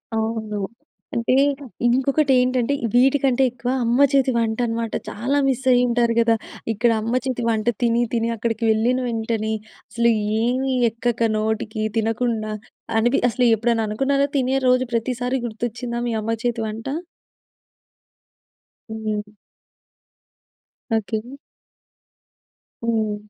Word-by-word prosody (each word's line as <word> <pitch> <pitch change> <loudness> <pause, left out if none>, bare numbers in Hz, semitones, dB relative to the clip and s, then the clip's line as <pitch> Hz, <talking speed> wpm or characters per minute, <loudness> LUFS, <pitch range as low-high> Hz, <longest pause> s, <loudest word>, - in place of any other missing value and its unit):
అవును. 220 -1 -2 0.6
అంటే 235 +2 +1 0.5
ఇంకొకటి 270 +3 +2
ఏంటంటే 250 +1 +1 0.2
వీటికంటే 265 +1 +3
ఎక్కువ 250 0 -5
అమ్మ 240 +4 +3
చేతి 270 -1 +3
వంట 225 0 0
అనమాట 230 -1 -3 0.2
చాలా 260 +7 -1
మిస్ 265 0 0
అయ్యి 245 0 +5
ఉంటారు 235 -1 +2
కదా! 230 -1 +4 0.4
ఇక్కడ 230 +3 +2
అమ్మ 230 +2 -2
చేతి 250 -2 -2
వంట 220 0 -1 0.2
తిని 235 0 +3
తిని 230 0 +1
అక్కడికి 225 +1 -2
వెళ్ళిన 240 +4 +2
వెంటనే 225 -1 -1 0.4
అసలు 235 +2 +2 0.3
ఏమి 260 +2 0 0.2
ఎక్కక 230 0 0
నోటికి 220 0 -2
తినకుండా 225 -1 -1 0.4
అని‌‌పి 240 +4 +2
అసలు 245 +1 +2
ఎప్పుడైనా 230 0 +1
అనుకున్నారా 275 +5 +1
తినే 265 +1 +1
రోజు 255 0 +4
ప్రతిసారి 250 +2 -1
గుర్తొచ్చిందా 235 +2 -4
మీ - - -1
అమ్మ 225 +1 -1
చేతి 235 -1 0
వంట? 225 +4 -6 2.0
హ్మ్. 220 -1 -3 1.8
ఓకే. 220 0 -2 1.6
హ్మ్. 220 -2 0
235 Hz, 115 wpm, -22 LUFS, 220-250 Hz, 2.0 s, అయ్యి